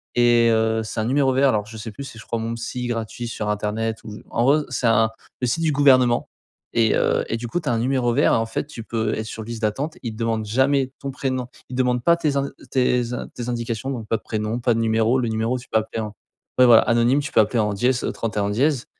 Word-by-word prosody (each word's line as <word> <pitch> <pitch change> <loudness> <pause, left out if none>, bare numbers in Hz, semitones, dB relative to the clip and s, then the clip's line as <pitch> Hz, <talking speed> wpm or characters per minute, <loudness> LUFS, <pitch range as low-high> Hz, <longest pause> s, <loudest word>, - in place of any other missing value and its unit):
et 120 -1 +5
heu, 110 0 +2
c'est 110 - -5
un 110 - 0
numéro 135 +2 +2
vert. 135 +1 +4
Alors, 105 -4 0
je 110 +1 -10
sais 110 +1 -6
plus 140 - -8
si, 130 -4 -10
je 110 - -11
crois 115 - -2
«mon 115 +1 -3
psy 120 +1 -4
gratuit» 115 0 -4
sur 105 -2 -4
internet 110 +2 -1
ou, 105 -1 -8
en 120 - 0
gros, 145 +4 +4
c'est 120 - 0
un 115 0 +4 0.3
le 125 - +1
site 165 +8 0
du 160 - +2
gouvernement 130 -4 +4 0.5
et 115 -2 +3
heu, - - +1
et 115 - -2
du 120 +1 -5
coup 175 - -1
tu 155 - -9
as - - +2
un 115 - 0
numéro 125 0 +1
vert 145 +5 +3
et - - +4
en 115 - 0
fait, 115 - -3
tu 115 -7 -8
peux 110 -2 -1
être 110 - -4
sur 110 0 -6
liste 115 0 -7
d'attente. 135 +9 -2
Ils 115 -3 -4
te - - -12
demandent 115 -1 -1
jamais 130 +4 +2
ton 140 0 -5
prénom. 130 -2 -2 0.2
Ils 125 - -6
demandent 125 -1 +1
pas 170 - +5
tes 150 -4 0
in 140 0 0 0.2
tes 125 -2 +1
in 125 - -4
tes 125 0 -5
indications. 120 +1 -3
Donc, 115 -5 -5
pas - - +1
de - - -17
prénom, 110 +2 -2
pas 120 0 +2
de 115 - -1
numéro 115 +2 +2
le 120 - 0
numéro. 110 +3 0
Tu 125 - -14
peux 110 - +2
appeler 110 +1 -4
en, 105 -1 -5 0.5
ouais, 125 - +8
voilà, 120 -2 +8
anonyme. 120 +4 +3
Tu 145 - -6
peux - - +6
appeler 110 +2 0
en 105 -1 +1
dièse, 125 +4 +1
au - - -1
31 105 -3 -2
dièse 130 +3 +1
115 Hz, 270 wpm, -22 LUFS, 110-130 Hz, 0.5 s, ouais